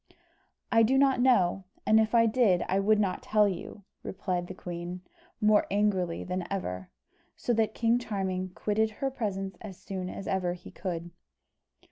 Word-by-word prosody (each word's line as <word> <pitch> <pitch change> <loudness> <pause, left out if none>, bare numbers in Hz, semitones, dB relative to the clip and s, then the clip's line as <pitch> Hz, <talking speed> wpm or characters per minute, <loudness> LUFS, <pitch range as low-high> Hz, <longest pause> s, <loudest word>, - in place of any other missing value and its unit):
"I 225 -1 +5
do 250 +4 +4
not 270 -2 +4
know; 195 -7 +3 0.2
and 220 +1 +5
if 220 +2 +1
I 230 0 +6
did, 220 -6 +3
I 190 - +1
would 210 +2 +3
not 195 -3 0
tell 210 -1 +3
you," 195 +2 -6 0.2
replied 180 -2 -3
the 185 - -8
queen, 175 0 -6 0.4
more 210 0 +4
angrily 195 -4 0
than 180 -1 -3
ever; 95 - -4 0.5
so 240 - 0
that 220 -1 +1
King 235 +1 +2
Charming 190 -5 -3
quitted 215 +1 +1
her 270 +5 -3
presence 195 -5 -3
as 195 -4 -8
soon 185 -2 -5
as 195 - -7
ever 185 -2 0
he 180 0 -11
could. 175 -2 -5
195 Hz, 165 wpm, -29 LUFS, 180-220 Hz, 0.5 s, I